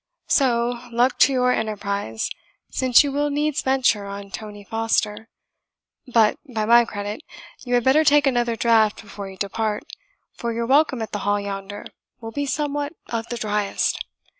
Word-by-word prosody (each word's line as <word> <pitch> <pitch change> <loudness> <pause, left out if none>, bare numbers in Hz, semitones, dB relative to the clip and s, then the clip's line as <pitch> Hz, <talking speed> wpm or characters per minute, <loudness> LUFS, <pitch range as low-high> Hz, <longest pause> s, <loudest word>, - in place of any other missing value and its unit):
So, 240 -3 +2
luck 245 +2 +2
to - - +6
your 250 -1 +2
enterprise, 200 - -2 0.4
since 255 0 +5
you 285 - -2
will 290 +1 0
needs 295 0 0
venture 250 -6 +1
on 200 0 -8
Tony 205 -1 -8
Foster; 225 0 -1 0.8
but, 225 -3 +4
by 220 -2 -1
my 235 +1 +6
credit, 205 +2 -5 0.4
you 245 -1 0
had 245 - +2
better 275 +5 +4
take 295 -1 +5
another 240 -3 +1
draught 225 -2 +3
before 200 -2 -8
you 190 - -12
depart, 210 +2 -2 0.5
for 235 - -4
your 235 +1 -2
welcome 270 -2 +3
at 220 - -7
the 205 - -3
Hall 205 +1 0
yonder 200 0 -6 0.3
will 225 -1 -7
be 285 +4 -3
somewhat 290 +1 -2 0.2
of 230 -1 -3
the 240 - -3
driest. 210 -2 -1
230 Hz, 165 wpm, -22 LUFS, 210-260 Hz, 0.8 s, to